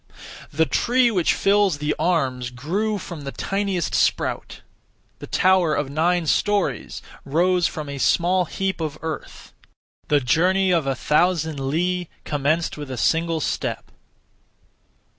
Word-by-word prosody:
The 160 +2 +1
tree 245 +6 +2
which 180 -6 +2
fills 200 -4 +2
the 150 +1 -1
arms 135 -7 0
grew 185 - -2
from 170 -5 -8
the 140 -1 -6
tiniest 195 -1 -2
sprout; - - 0 0.6
the - - -8
tower 185 -4 +3
of 145 -1 -2
nine 170 +3 +1
storeys 195 - 0 0.2
rose 175 +4 +2
from 155 -2 -6
a 140 -1 -6
(small) 180 +5 +2
heap 190 0 -3
of 155 -2 -3
earth; 160 -1 -7 0.5
the 145 - +3
journey 180 +9 +2
of 165 -5 +1
a 135 - 0
thousand 160 +1 +1
li 175 +6 -1
commenced 155 +3 -1
with 145 -2 -7
a 130 - -5
single 165 +4 +1
step. - - -3
165 Hz, 135 wpm, -22 LUFS, 145-185 Hz, 0.6 s, tower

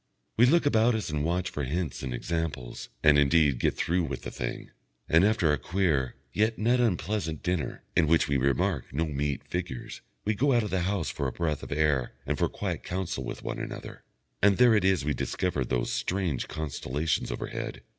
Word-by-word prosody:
We 120 +3 +6
look 165 +4 +4
about 115 -3 +4
us 110 -7 -3
and 75 -1 -1
watch 90 +2 -1
for 75 - -3
hints 75 +2 -2
and 65 - -4
examples, 70 -2 -3
and, 75 -1 +6
indeed, 70 -2 +4
get - - +1
through 90 +2 +1
with 70 -3 -5
the - - -5
thing. - - -5 0.4
And 80 +3 +5
after 105 -5 +3
our 75 - +1
queer, 75 -6 0 0.2
yet 110 +2 +1
not 120 +4 +2
unpleasant, 95 -6 -1
dinner, 90 -3 -2
in 85 -2 +4
which 80 +1 +4
we 70 - 0
remark 70 +4 0
no 80 +6 0
meat 70 -2 -2
figures, 90 -8 -5 0.2
we 105 - +2
go 135 +6 +2
out 120 -2 +3
of 105 - -4
the 95 - +1
house 95 -9 -1
for - - -2
a - - -2
breath 80 -4 -2
of - - -9
air 70 -4 +1
and - - 0
for - - +1
quiet - - -3
counsel 90 -6 -3
one - - -4
with - - -3
another, - - -7 0.4
and 100 -1 +5
there 125 -2 +6
it 105 -3 +3
is 95 -6 +2
we 75 - +1
discover 75 +1 -1
those - - -1
strange 90 -8 -1
constellations 75 0 -2
overhead. - - -5
80 Hz, 200 wpm, -28 LUFS, 70-100 Hz, 0.4 s, We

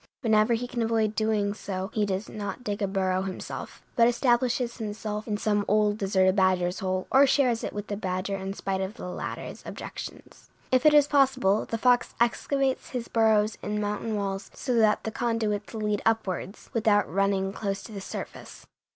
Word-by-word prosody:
Whenever 220 -1 +3
he 245 +2 -3
can 240 -1 -3
avoid 225 -2 +1
doing 215 -2 +1
so 195 -1 -5
he 210 -2 +1
does 195 +2 -2
not 205 +2 -6
dig 205 -2 -3
a 200 - +1
burrow 190 -1 0
himself, 190 -1 -6
but 235 -3 +6
establishes 240 0 +1
himself 210 -1 -4
in 210 -2 -1
some 205 -1 +1
old, 210 0 +2
deserted 190 -1 +3
badger's 185 -2 +2
hole, 185 -1 -1
or 275 +1 +6
shares 255 -4 +2
it - - -3
with 205 0 -5
the 205 - -4
badger 190 0 -2
in 190 0 -4
spite 195 -1 -2
of 190 +3 -4
the - - -8
latter's 180 - -6
objections. - - -9 0.2
If 255 +3 +4
it 300 - +6
is 290 -1 +6
possible, 260 -8 +3
the 230 - -2
fox 245 +1 +2
excavates 265 +3 +1
his 245 -2 -4
burrows 220 -1 +3
in 210 0 -2
mountain 210 +1 -2
walls, 195 -1 -3
so 255 - -2
that 215 -1 +3
the 220 - -3
conduits 220 -3 -1
lead 210 -1 -1
upwards, 205 -3 -2
without 215 -3 +3
running 195 +2 0
close 200 -2 -3
to - - -10
the 200 -2 -6
surface. - - -8
210 Hz, 185 wpm, -27 LUFS, 195-230 Hz, 0.2 s, but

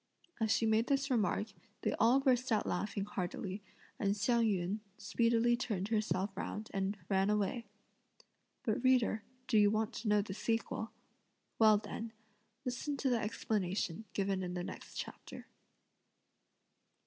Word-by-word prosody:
As 220 -1 +1
she 225 - +3
made 220 +2 +3
this 275 0 +1
remark, 215 -2 +1 0.3
they - - +1
all 240 +4 +6
burst 255 -2 +2
out 215 - +2
laughing 200 +2 -1
heartily, 195 0 -4 0.4
and 200 -1 +1
Hsiang 235 +2 +3
yün 195 0 0 0.2
speedily 235 0 +2
turned 210 -5 -2
herself 200 -3 0
round 215 +2 -4
and 195 +1 -1
ran 195 0 +2
away. 210 +2 0 1.0
But 230 -1 0
reader, 250 -4 +4 0.3
do 220 - +4
you 205 -1 +6
want 215 +1 0
to 235 - -5
know 210 -1 +4
the 195 - -6
sequel? 225 +1 -1 0.7
Well, 215 -2 +7
then 220 +2 -6 0.5
listen 260 +3 -2
to 265 -1 +1
the 240 - +3
explanation 205 -3 -1
given 195 -1 0
in 180 -1 -3
the 175 - -2
next - - -8
chapter. - - -7
215 Hz, 145 wpm, -34 LUFS, 200-230 Hz, 1.0 s, Well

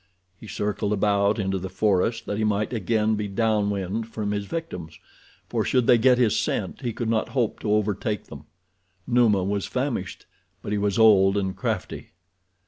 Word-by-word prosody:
He 110 - -13
circled 105 0 -2
about 100 +1 +2
into 95 -2 -1
the 95 +1 -5
forest 105 +4 0
that 105 - -3
he - - 0
might 105 +2 0
again 110 0 +1
be 105 -1 -2
down 105 0 +1
wind 100 +3 -3
from 105 -2 -4
his 100 -1 -2
victims, 90 - -6 0.5
for - - -1
should 125 -2 +1
they 120 - +5
get 125 +1 +5
his 120 -4 +2
scent - - -2
he 120 - -2
could 115 +1 -4
not 110 -1 0
hope 120 -4 0
to 105 - -2
overtake 105 0 0
them. 75 -1 -12 0.6
Numa 115 -6 +3
was 100 +1 -2
famished; 125 - -3 0.4
but - - -5
he 105 - 0
was 100 -1 0
old 100 -3 +5
and 95 -1 -1
crafty. 110 -1 -4
105 Hz, 180 wpm, -24 LUFS, 100-115 Hz, 0.6 s, they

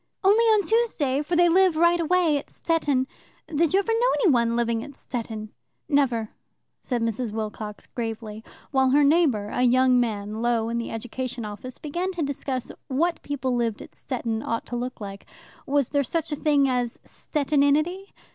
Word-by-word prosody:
"Only 415 +4 +5
on 430 -2 +4
Tuesday, 345 - +1
for 340 +4 -2
they 350 +1 +5
live 365 0 +4
right 340 +1 +4
away 335 -1 +2
at - - -12
Stettin. 290 -6 0 0.4
Did 320 0 +1
you 380 - +4
ever 400 +3 -1
know 480 +2 +3
any 390 -9 +5
one 235 -2 +2
living 235 -1 0
at 280 - -10
Stettin?" 220 -5 -5 0.4
"Never," 245 -7 +1 0.5
said 245 -3 -2
Mrs. 230 0 -2
Wilcox 215 -1 -5
gravely, 225 -3 -5 0.3
while 265 -2 +3
her 290 +3 +4
neighbour, 280 -9 +3
a 245 - -2
young 255 0 +4
man 215 -2 -2
low 235 -1 +2
down 225 - -3
in 235 - -1
the 230 - -4
Education 245 +1 -5
Office, 210 +4 -7
began 345 +5 -3
to 345 -3 -2
discuss 270 -3 -3 0.2
what 325 +5 0
people 265 -3 -3
who 245 - +1
lived 230 -2 -1
at - - -11
Stettin 230 -4 -3
ought 230 0 -3
to 245 - -5
look 250 +1 -4
like. 200 -1 -8 0.4
Was 280 -2 +1
there 285 - +2
such 325 +4 -2
a - - 0
thing 290 -2 +3
as 245 -2 -1
Stettininity? 300 +6 0
260 Hz, 185 wpm, -25 LUFS, 230-320 Hz, 0.5 s, Only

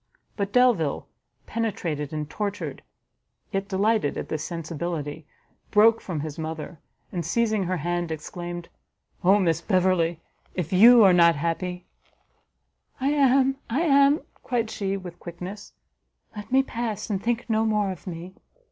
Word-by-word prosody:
But 200 -1 -2
Delvile, 225 - +2 0.4
penetrated 170 -10 -3
and 150 -1 -3
tortured, 205 +5 -4 0.7
yet 195 0 -2
delighted 200 -4 +1
at - - -5
this 155 -1 -3
sensibility, 160 -2 -5 0.4
broke 220 +2 +5
from 165 -6 -4
his 155 0 -6
mother, 160 +1 -5 0.3
and 175 -2 -3
seizing 215 +3 +1
her 185 +1 -1
hand, 175 +1 -2
exclaimed, 175 +2 -6 0.6
"Oh 190 +3 +6
Miss 165 -4 +1
Beverley, 180 -3 +1 0.4
if 180 -1 -3
you 230 +5 +8
are 190 -2 +7
not 170 -1 +6
happy 180 +4 -3 0.6
" - - -43
"I 270 +2 +1
am! 270 -2 +3
I 255 +7 0
am!" 280 -2 +4 0.2
cried 230 -3 -1
she, 195 -2 -2
with 180 -2 -9
quickness; 180 +4 -8 0.6
"let 210 +1 -8
me 265 +1 +5
pass, 230 -5 -4
and 195 -2 -1
think 235 +1 -1
no 220 -1 +2
more 210 -3 +1
of 185 +1 -10
me." 175 +1 -7
185 Hz, 145 wpm, -25 LUFS, 170-220 Hz, 0.7 s, you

